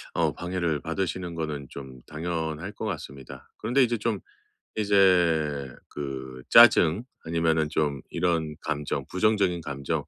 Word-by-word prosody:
어 - - +2
방해를 90 -3 -2
받으시는 90 0 -3
거는 75 -4 -4
좀 65 -2 -10
당연할 80 +2 -3
것 - - -6
같습니다. 70 - -7
그런데 130 +3 +2
이제 120 -1 +1
좀 110 -1 -1 0.6
이제 85 -9 +3 0.2
그 65 -3 -6
짜증 85 +9 +7 0.2
아니면은 80 -1 +1
좀 75 -3 0
이런 80 -4 0
감정 75 0 -3
부정적인 95 -3 +2
감정 70 -2 -3
80 Hz, 270 characters per minute, -26 LUFS, 75-95 Hz, 0.6 s, 짜증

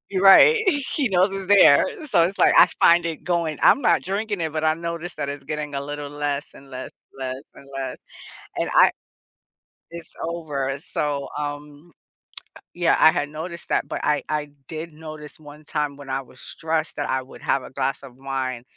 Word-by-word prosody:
Right. 195 - +7
He 285 - -1
knows 190 +1 +2
it's 195 -1 -6
there. 145 -7 +7 0.2
So 170 - +4
it's 185 +4 -2
like, - - +5
I - - +9
find 170 0 +5
it 165 -2 -4
going 170 -3 -1
I'm 280 - +5
not - - +3
drinking 205 +1 -3
it, 160 -2 -2
but 155 - -2
I 155 0 +3
noticed 170 +1 -6
that 145 -2 -3
it's 140 -1 -6
getting 150 0 -5
a 140 - -2
little 145 0 -6
less 145 +1 -3
and 135 - -16
less, 130 0 -7 0.3
less 130 0 -5
and 140 - -15
less. 130 -1 -4 0.6
And - - -1
I - - +7 1.0
it's 170 -1 -9
over. 140 -5 -3
So, 145 -1 -3
um, 145 +2 -7 0.8
yeah, 175 -1 +2
I 160 - +7
had 145 - -2
noticed 165 +2 -7
that, - - 0
but - - -4
I 150 -1 +1
I 150 -1 -2 0.2
did 160 +1 -6
notice 155 -1 -10
one 150 0 -13
time 150 -2 -3
when 140 -1 -12
I 135 +1 -1
was 130 0 -18
stressed 160 0 -3
that - - -3
I 130 0 0
would 130 - -14
have 135 - 0
a - - -10
glass 135 0 -2
of 130 -3 -12
wine 130 -2 -4
150 Hz, 190 wpm, -23 LUFS, 140-170 Hz, 1.0 s, I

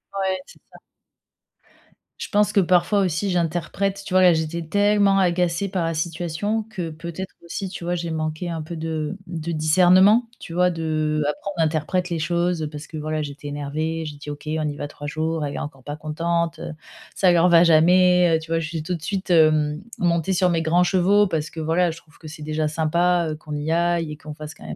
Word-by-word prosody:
Ouais, 190 -1 -1
c'est - - -17
ça. - - -14 1.4
Je - - -5
pense 210 0 +2
que - - +4
parfois 180 +2 +3
aussi 190 +1 0
j'interprète. 180 +3 -1
Tu - - -6
vois, 185 - +5
là, 180 -2 +7
j'étais 160 +1 -2
tellement 205 +3 +3
agacée 180 0 +1
par 185 -2 -2
la 165 0 -1
situation 170 +6 -2
que 180 -6 -4
peut-être 170 +4 -7
aussi, 185 +3 -5
tu 180 - -8
vois, 175 +1 -1
j'ai 170 -1 -4
manqué 155 +2 -3
un 165 -1 -3
peu 160 +3 -7
de 160 +2 -3
de 170 -1 -4
discernement, 185 +8 +4
tu 165 - -9
vois 180 +1 +3
de 155 -2 -1
après 150 +7 -3
on - - +1
interprète 160 +3 0
les 170 -2 -2
choses 170 -1 0
parce 150 0 -8
que, 160 - -8
voilà, 155 0 -2
j'étais 145 0 -8
énervée, 155 +3 -3
j'ai 150 -1 -7
dit: 145 +1 -9
«OK, 145 0 -7
on 155 0 -1
y 145 - -3
va 145 - -4
3 155 +2 -3
elle 140 - -4
est - - -3
encore 135 -3 -7
pas 145 +2 -5
contente, 165 +2 -2
heu, - - -6 0.4
ça 185 -2 +4
leur 175 +1 +4
va 170 -1 +7
jamais, 175 +1 +5
heu» - - -5
tu 160 +1 -11
vois, 165 - +2
je 165 - -3
suis 160 -1 -4
tout 180 +3 -2
de 165 - -9
suite, 190 +2 -3
hem, 155 -2 +3 0.2
montée 170 +1 +1
sur 180 0 +3
mes 165 -2 +1
grands 165 +2 +3
chevaux 195 +3 +3
parce 155 -4 -2
que 165 - -9
voilà, 165 +3 +1
je 160 - -10
trouve 160 -2 -19
que 160 - -11
c'est 155 0 -9
déjà 155 0 -1
sympa, 170 +3 +1
heu, - - -4
qu'on 150 -1 -7
y 150 +2 -2
aille 170 -1 +1
et 150 - -7
qu'on 155 0 -9
fasse 150 +1 -9
quand - - -15
même - - -6
165 Hz, 225 wpm, -23 LUFS, 155-180 Hz, 1.4 s, là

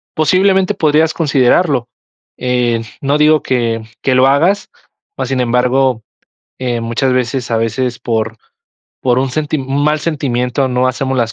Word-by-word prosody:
posiblemente 190 +4 +2
podrías 155 -2 +2
considerarlo. 140 -3 +2 0.5
Eh, 125 -2 0 0.2
no 140 +1 +1
digo 150 0 +4
que, 115 -3 -1 0.2
que 130 - +1
lo 130 +1 +5
hagas, 170 +9 +2 0.5
más - - -3
sin 135 -1 -1
embargo, 125 0 +1 0.6
eh, 120 -2 -2
muchas 120 +3 -1
veces, 125 0 -1
a 115 - +1
veces 120 +2 -2
por 115 -1 -2 0.6
por 125 -1 +1
un 130 0 0
senti 155 +2 -2
un 135 +2 -1
mal 150 0 +1
sentimiento 135 -4 -1
no 125 0 +1
hacemos 130 +1 -2
las 115 -3 0
130 Hz, 150 wpm, -15 LUFS, 120-150 Hz, 0.6 s, lo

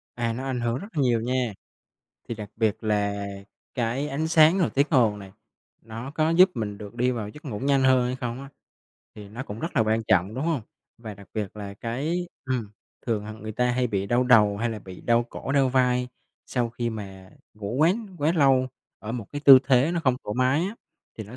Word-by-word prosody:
À, 115 -1 -1
nó 125 +3 -5
ảnh 130 -2 -2
hưởng 120 +1 0
rất 200 - -7
nhiều 125 -5 +2
nha, 125 -2 -1 0.8
thì 115 - -3
đặc 105 -2 -8
biệt 110 -1 0
là 100 -1 0 0.5
cái 125 +4 -1
ánh 150 +3 -2
sáng 165 +2 +6
rồi 180 - +2
tiếng 140 +2 +3
ồn 115 -8 +3
nè 95 -2 -11 0.5
nó 115 +4 -7
có 155 +1 +1
giúp 180 +3 +6
mình 105 -3 -4
được 105 +1 -9
đi 125 +1 +1
vào 110 -4 -3
giấc 150 +9 -13
ngủ 115 -8 -5
nhanh 135 +1 +2
hơn 130 -2 +4
hay 125 +1 -2
không 125 -1 -4
á, 140 - -9 0.7
thì 105 -2 -10
nó 120 +5 -6
cũng 105 -4 -8
rất 165 0 -5
là - - +5
quan 110 +1 +1
trọng, 95 +4 +2
đúng 135 - -3
hông? 160 -7 0 0.4
Và 110 -3 -8
đặc 100 0 -15
biệt 105 -1 -4
là 100 -1 -7
cái 150 - -3 0.2
ừm, 125 -6 -2 0.4
thường, 110 -3 -1
à, 110 - -6
người 110 0 -7
ta 125 +3 +1
hay 125 0 +1
bị 100 -3 -2
đau 120 +3 +2
đầu 105 -5 +5
hay 115 +2 -1
là 110 - -5
bị 95 -2 -11
đau 120 0 +2
cổ, 135 - -5
đau 135 -2 +3
vai, 125 -1 +2 0.4
sau 120 -2 -1
khi 120 0 -3
mà 95 -4 -8 0.2
ngủ 105 +1 -5
quá 160 +4 +5 0.3
quá 150 +3 +2
lâu 135 -5 +3 0.3
ở 110 +1 -6
một 115 -4 -5
cái 145 - -4
tư 135 -2 +11
thế 135 +3 +3
nó 170 - 0
không 130 -4 +2
thoải 105 - -4
mái 130 +4 +2
á, 205 - -5 0.4
thì 110 - -5
nó 115 +5 -11
120 Hz, 230 wpm, -25 LUFS, 105-135 Hz, 0.8 s, tư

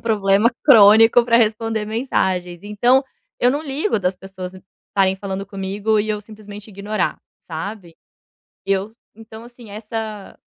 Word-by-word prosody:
problema 210 0 +2
crônico 225 -2 +7
pra 235 -1 +4
responder 225 -1 0
mensagens. 190 -6 -2
Então, 240 +6 +2 0.3
eu 245 - +3
não 290 +4 -2
ligo 290 - -1
das 180 0 -1
pessoas 185 -1 -9 0.3
estarem 190 -1 +1
falando 195 0 -5
comigo 200 +2 -1
e 215 - -4
eu 210 -1 -2
simplesmente 210 0 -12
ignorar, 205 0 -3 0.2
sabe? 175 +1 -7 0.7
Eu 195 +2 -1 0.2
então, 220 +1 -12
assim 240 -2 -14
essa 215 0 -7
210 Hz, 130 wpm, -20 LUFS, 195-225 Hz, 0.7 s, crônico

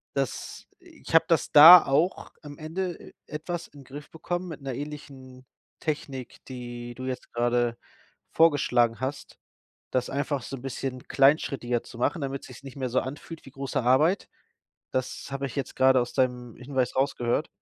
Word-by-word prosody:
Das - - -4
ich 345 - -12
habe 165 0 +6
das 165 - +1
da 160 +3 +11
auch 155 +7 0
am 145 -1 -10
Ende 175 +3 -3
e - - -14
etwas 170 +3 -5
in 145 - -15
'n - - -14
Griff 145 +3 -10
bekommen 175 +3 -4
mit 150 -3 -8
'ner 135 -2 -4
ähnlichen 140 -3 -9 0.4
Technik, 140 -5 -5
die 120 -1 -7
du 130 - -8
jetzt 130 -1 -5
grade 120 0 +1 0.6
vorgeschlagen 125 -8 +3
hast, 135 +2 -5 0.5
das 130 -1 0
einfach 140 -1 -2
so 135 - -6
'n - - -12
bisschen 130 -1 -5
kleinschrittiger 135 -4 +2
zu - - -12
machen, 145 +5 0
damit 135 0 -4
sich's 130 +1 -13
nicht 135 -2 -10
mehr 130 -2 -2
so 130 - +2
anfühlt 145 +4 -8
wie 135 - -12
große 135 -1 -3
Arbeit. 150 +10 +3 0.6
Das 130 +1 -3
habe 135 0 -3
ich 130 - -10
jetzt 135 - -4
grade 130 0 +5
aus 120 - -5
deinem 125 -2 -1
Hinweis 130 -1 -2
rausgehört. 135 +1 0
135 Hz, 170 wpm, -26 LUFS, 125-150 Hz, 0.6 s, da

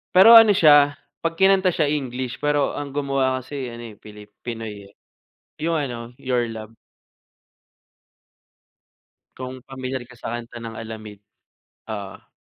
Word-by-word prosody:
pero 190 +5 +9
ano 225 -3 +9
siya, 145 -4 +6 0.2
'pag 165 0 -2
kinanta 190 0 +3
siya 150 -3 +1
English 130 -3 -3
pero 145 -1 +1
ang 145 -1 -6
gumawa 135 -2 0
kasi 135 0 -6
ano, 120 0 -8
eh, - - -15
pili 105 0 -12 0.2
Pinoy, 110 -4 -7
eh. 100 - -23 0.7
Yung 165 0 +1
ano 120 -5 -5
Your 125 -3 -1
love. 110 0 -9 2.6
Kung 130 0 -7
pamilyar 130 -1 -5
ka 125 - -15
sa 115 - -6
kanta 120 0 -7
ng 115 -1 -7
Alamid. 110 -2 -9 0.7
Oo. 100 -2 -8
130 Hz, 135 wpm, -22 LUFS, 115-145 Hz, 2.6 s, pero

